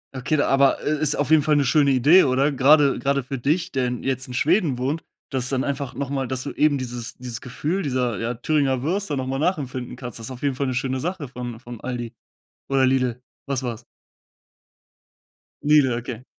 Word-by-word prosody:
Okay, 145 +3 0
aber, 135 -1 +3
äh, 150 0 0
ist 150 -1 +3
auf 145 - -1
jeden 155 -2 +6
Fall 150 0 +3
'ne 140 - +2
schöne 140 +2 +4
Idee, 145 +9 +6
oder? 135 +2 +2
Grade 140 +1 +5
grade 140 0 0
für 135 +2 -5
dich, 150 +8 0
der 130 -2 +1
in 125 -1 -4
jetzt 130 -1 -1
in 125 - -8
Schweden 155 - +2
wohnt, 140 +6 -2 0.3
dass 130 -3 -2
dann 135 -1 0
einfach 140 -1 -3
noch 140 -1 -3
mal 135 -2 -2
dass 130 -1 -2
du - - -5
eben 150 -2 +3
dieses 120 -2 -6
dieses 125 -1 -6
Gefühl 150 +9 -2
dieser, 125 - -1
ja, 115 +2 -2
Thüringer 135 0 +1
Würste 175 -3 -1
noch 130 0 -3
mal 135 - -2
nachempfinden 130 -7 -2
kannst. 125 -3 -7
Das 115 +3 -6
auf 125 - -9
jeden 140 -2 +1
Fall 140 0 -1
'ne 130 - -1
schöne 130 0 -1
Sache 175 -3 -3
von 120 -2 -7
von 120 -2 -10
Aldi. 120 -2 -5 0.6
Oder 135 -1 +3
Lidl? 130 -2 +1 0.2
Was 135 -2 -2
war's? 120 -1 -5 1.8
Lidl, 145 -4 +4
okay. 120 0 -6
135 Hz, 205 wpm, -23 LUFS, 125-145 Hz, 1.8 s, jeden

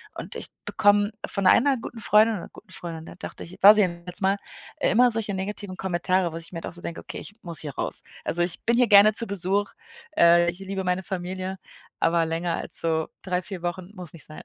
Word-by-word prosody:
und - - -7
ich - - -2 0.2
bekomme 205 0 +3
von 195 -2 0
einer 265 +6 +5
guten 230 0 -8
Freundin 215 +2 +4
oder - - -9
guten 205 -2 -16
Freundin, 165 -2 -7
da - - -11
dachte - - -8
ich, 175 - -11
war 205 +2 +10
sie 210 -1 +4
zumindest 175 +1 -4
mal, 195 +1 +3 0.4
äh, - - +1
immer 245 +4 +5
solche 220 -2 -2
negativen 190 0 -5
Kommentare, 180 -1 0
wo - - -5
ich 165 +1 -6
mir 165 - -5
dann - - -6
auch - - -13
so 175 - -5
denke: 170 - -6
„Okay, - - -8
ich 205 - -11
muss 170 -3 -5
hier 145 -4 -6
raus.“ - - -2 0.2
Also, 175 - 0
ich 175 -1 -3
bin 235 +1 +3
hier 245 -1 +4
gerne 205 +1 +7
zu 230 +2 +2
Besuch. 200 +2 0 0.5
Äh, 170 0 +6
ich 175 +2 -6
liebe 195 0 -4
meine 180 +1 0
Familie, 185 +1 -4 0.4
aber 165 0 +3
länger 165 +1 -1
als - - -2
so 160 -1 0
3, 180 -1 -1
4 185 -1 -8
Wochen 175 +2 -4
muss 180 -3 -5
nicht 165 -4 -7
sein. 155 - -10
185 Hz, 235 wpm, -25 LUFS, 170-205 Hz, 0.5 s, war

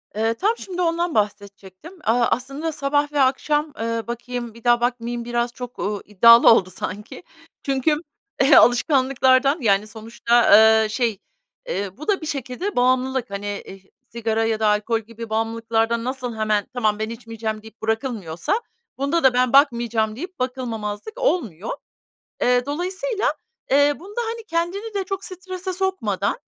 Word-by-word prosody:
Eee, 225 +1 +1
tam 420 - 0
şimdi 360 -2 -5
ondan 340 -1 0
bahsedecektim. 205 - -4
Aaa, 235 +2 +3
aslında 275 +6 -2
sabah 290 0 0
ve 290 -1 +1
akşam, 295 +3 +1
ııı, 230 0 -2
bakayım, 240 0 -5
bir 230 0 -16
daha 240 -1 +4
bakmayayım 240 -1 -2
biraz 240 0 -1
çok, 245 -1 -9
ııı, 205 0 -2
iddialı 230 +4 +7
oldu 190 -5 +4
sanki. 200 - -7 0.4
Çünkü 275 +2 +1 0.6
alışkanlıklardan, 260 +2 +4
yani, 205 -2 +2
sonuçta, 230 +2 +1
ııı, 220 +1 +6
şey, 225 -3 -1 0.5
eee, 200 - -4
bu 305 - -9
da 400 -3 +1
bir - - -6
şekilde 285 - -4
bağımlılık. 255 0 +1
Hani, 200 +1 -5 0.2
eh 195 - -11 0.3
sigara 225 -1 -1
ya 225 -1 0
da 220 - +2
alkol 210 +2 +1
gibi 230 +1 -10
bağımlılıklardan 225 +1 0
nasıl 250 -2 -4
hemen, 215 -2 0
"Tamam, 215 -4 0
ben 220 0 -2
içmeyeceğim." 225 -2 -5
deyip 220 +1 -15
bırakılmıyorsa 220 - -2 0.4
bunda 280 +5 0
da, 265 -2 +5
"Ben 250 0 +2
bakmayacağım." 235 -6 +3
deyip 360 +7 -8
bakılmamazlık 250 - -4
olmuyor. 240 - -1 0.7
Eee, 245 0 +3
dolayısıyla, 375 - -2 0.4
eee, 285 +1 +5
bunda, 410 +7 -5
hani, 460 0 -7
kendini 390 +4 -3
de 400 -1 -1
çok 390 +1 -5
strese 370 0 -5
sokmadan, 380 +5 -1
245 Hz, 145 wpm, -22 LUFS, 220-295 Hz, 0.7 s, iddialı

